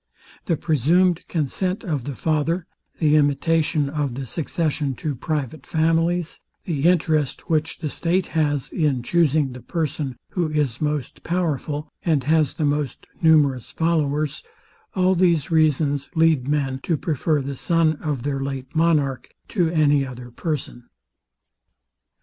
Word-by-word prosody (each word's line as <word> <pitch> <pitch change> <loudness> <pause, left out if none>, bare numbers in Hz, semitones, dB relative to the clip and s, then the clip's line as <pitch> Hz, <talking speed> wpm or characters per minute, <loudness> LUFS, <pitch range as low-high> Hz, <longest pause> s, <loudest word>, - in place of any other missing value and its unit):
The 165 - +1
presumed 170 +4 +2
consent 180 - -1
of 150 - -2
the 140 - -4
father, 160 +4 0 0.3
the 150 -2 +3
imitation 150 +1 +2
of 140 -3 -2
the 135 +1 -4
succession 150 -1 -2
to 150 +4 -3
private 145 +1 -3
families, 165 +2 0 0.2
the 155 -4 -2
interest, 155 -3 0
which 155 -1 0
the 160 - -4
state 175 +2 0
has 145 -4 0
in 145 -7 0
chusing 155 -3 +2
the 125 - -9
person, 150 -5 -3
who 175 -4 -1
is 150 -5 -1
most 150 -4 -2
powerful, 155 -3 -2 0.2
and 155 -6 +2
has 155 +1 +2
the 155 - 0
most 145 -2 -1 0.2
numerous 145 -6 +3
followers; 155 -2 0 0.5
all 185 0 +3
these 170 -4 +2
reasons 150 -3 +2
lead 160 -5 +3
men 140 -3 0
to 165 +1 0
prefer 155 0 0
the 140 0 -4
son 165 +1 +2
of 145 -6 -3
their 140 -1 -1
late 135 0 -5
monarch 155 -5 +1 0.2
to 175 -6 +1
any 145 -4 +3
other 125 -2 -8
person. 130 -4 -4
150 Hz, 140 wpm, -23 LUFS, 140-165 Hz, 0.5 s, the